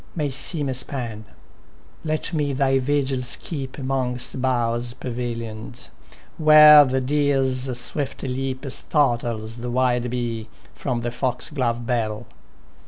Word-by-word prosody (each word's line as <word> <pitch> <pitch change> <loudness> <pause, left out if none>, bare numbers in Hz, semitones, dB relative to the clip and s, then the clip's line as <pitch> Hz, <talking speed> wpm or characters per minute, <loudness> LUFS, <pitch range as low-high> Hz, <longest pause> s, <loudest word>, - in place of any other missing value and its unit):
May 150 -4 -1
seem 145 +2 -3
a 130 - -1
span; 120 -4 -3 0.8
let 155 +2 -2
me 145 -3 0
thy 135 0 +2
vigils 130 -2 +1
keep 135 -5 -6
'Mongst 130 -2 -1
boughs 120 -2 0
pavilion'd, 115 -1 -5 0.5
^ere 150 -2 +9
the 130 +1 +1
deer's 135 -2 0
swift 140 +2 -3
leap 130 +1 -3
Startles 120 -7 0
the 120 +1 -5
wild 125 -1 +1
bee 115 -2 -3 0.2
from 125 -4 -3
the 120 - -2
fo^loTe 125 -1 -1
bell. 115 -2 -2
130 Hz, 115 wpm, -23 LUFS, 120-140 Hz, 0.8 s, ^ere